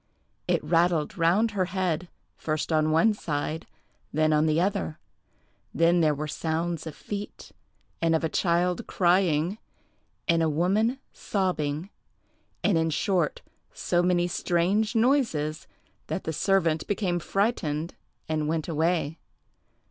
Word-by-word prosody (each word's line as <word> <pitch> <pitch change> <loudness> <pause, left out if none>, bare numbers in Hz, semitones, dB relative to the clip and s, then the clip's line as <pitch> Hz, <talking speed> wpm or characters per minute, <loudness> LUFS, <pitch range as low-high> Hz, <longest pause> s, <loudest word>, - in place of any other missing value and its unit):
It - - +1
rattled 165 +1 +2
round 185 +6 +3
her 195 -3 0
head, 180 -2 -2 0.3
first 155 +1 -3
on 155 -1 +3
one 165 +8 +4
side, 155 -3 -3 0.4
then 155 +1 +2
on 155 +1 +3
the 155 +1 +2
other; 130 - -1 0.8
then 170 +1 +4
there 155 -2 +3
were 150 +2 -4
sounds 165 +1 -2
of 155 - -7
feet, 205 0 -7 0.5
and 165 -1 +3
of 160 - 0
a - - +2
child 175 +2 0
crying, 175 0 +2 0.7
and 165 -1 +3
a 160 - +2
woman 200 - +1 0.2
sobbing; 180 -3 -2 0.7
and, 175 -6 +3
in 160 0 +1
short, 175 0 0 0.3
so 175 - +1
many 175 -1 +2
strange 185 +6 0
noises 220 - +1 0.4
that 190 - -3
the 160 - -3
servant 165 -3 +1
became 190 -4 0
frightened 170 -5 -1 0.3
and 155 -1 -1
went 160 0 -1
away. 160 -1 0
170 Hz, 130 wpm, -27 LUFS, 155-185 Hz, 0.8 s, one